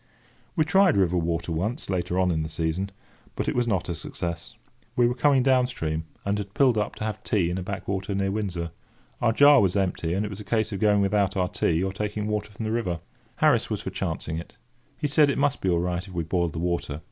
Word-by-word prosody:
We 155 -4 +3
tried 190 - +4
river 90 -2 +3
water 85 0 -2
once, 105 - -2
later 90 -1 -1
on 90 -1 +3
in 80 -2 0
the 80 - -3
season, 80 +4 -2 0.5
but - - -2
it - - +1
was 120 -1 +1
not 95 -6 0
a 85 - -2
success. 85 +1 -5 0.4
We 120 - +4
were 120 - +2
coming 135 0 +3
down 130 -1 +4
stream, 80 -9 -3 0.2
and 100 +1 0
had 100 -1 -7
pulled 130 -4 +4
up 105 -1 -1
to - - -6
have 110 -1 -3
tea 90 -5 +1
in 90 - -2
a - - -4
backwater 95 +1 -3
near 95 0 0
Windsor. 90 -5 -3 0.5
Our 120 - +4
jar 145 +4 +7
was 95 -2 +2
empty, 90 -3 0
and 100 +2 0
it - - -4
was 100 -1 -7
a - - -7
case 110 +1 0
of 100 - -3
going 105 -1 +4
without 100 -1 +1
our 90 -1 +1
tea 90 -3 +1
or 95 0 -2
taking 105 +1 -3
water 105 0 -2
from 105 +2 -6
the 110 - -1
river. 95 -7 -1 0.4
Harris - - +3
was - - -2
for - - -5
chancing 80 +1 -3
it. 85 - -11 0.4
He - - -3
said 145 0 +4
it - - 0
must 140 -1 +1
be 95 - +1
all 85 - +3
right 90 +2 -2
if 95 - -11
we 85 - 0
boiled 85 -1 0
the - - -6
water. 85 -3 -2
100 Hz, 245 wpm, -26 LUFS, 85-110 Hz, 0.5 s, jar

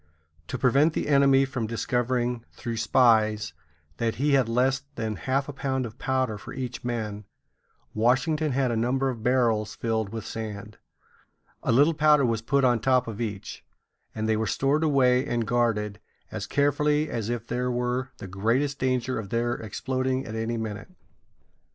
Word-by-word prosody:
To - - -4
prevent 140 +5 +3
the - - -2
enemy 140 -1 +5
from 130 -4 -3
discovering, 120 +1 -1
through 115 -2 -5
spies, 110 -5 +3 0.4
that 115 -1 -1
he 145 +4 +1
had 135 -4 +3
less 130 +3 +2
than 110 -3 -3
half 130 - -1
a 145 - -6
pound 130 -1 -2
of 115 +1 -9
powder 130 -5 -1
for - - -9
each 125 -2 -5
man, 110 -4 -4 0.7
Washington 145 +7 +1
had 130 -1 +1
a - - 0
number 130 +4 +1
of 120 -4 -5
barrels 115 -3 +1
filled 110 -3 -1
with 110 0 -6
sand. 105 -1 -7 0.8
A - - 0
little 145 +7 +5
powder 150 -2 +4
was 115 -2 0
put 140 +4 +1
on 120 -2 +3
top 125 +2 +2
of 115 0 -5
each, 105 -3 -5 0.5
and 110 0 -2
they 110 - +2
were 110 0 -1
stored 140 +7 +1
away 130 -4 +3
and 120 -4 -1
guarded 105 -3 0 0.3
as - - -5
carefully 150 +1 +2
as 115 -5 -3
if 120 -1 -3
there 125 +1 -2
were 125 +1 -1
the - - -8
greatest 115 +9 0
danger 130 -1 0
of 100 -3 -7
their 120 +2 0
exploding 130 +4 -2
at 110 - -7
any 115 +1 -2
minute. 105 - -5
120 Hz, 170 wpm, -26 LUFS, 110-135 Hz, 0.8 s, enemy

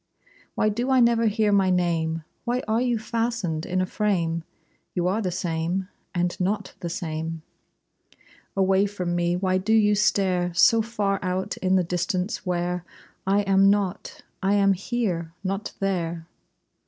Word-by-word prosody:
Why 215 - +2
do 240 +5 -2
I 260 -1 +4
never 235 -1 +4
hear 215 0 +2
my 195 -2 +4
name? 165 -3 0 0.2
Why 250 +1 -1
are 220 +2 +1
you 245 -2 +1
fastened 225 -8 -2
in 185 0 0
a - - +1
frame? 175 -5 0 0.5
You 175 -1 +1
are 200 +5 +1
the 185 - -1
same, 175 +2 -2 0.3
and 175 0 0
not 200 +2 -1
the 170 - -4
same. 160 -1 -4 1.1
Away 195 +1 +3
from 180 -4 -3
me 175 0 +1
why 185 0 +1
do 220 +4 0
you 210 -2 +5
stare 190 -4 +1
So 225 +5 +6
far 205 -3 -1
out 185 +2 -2
in 185 0 +1
the 185 - +3
distance 180 +4 -2
where 180 0 -1 0.4
I 200 +1 +3
am 195 0 +4
not? 200 -2 -1 0.2
I 195 +1 +2
am 195 -1 +4
here! 185 -5 -2
Not 195 +2 -3
there! 170 -4 -2
190 Hz, 155 wpm, -25 LUFS, 175-210 Hz, 1.1 s, So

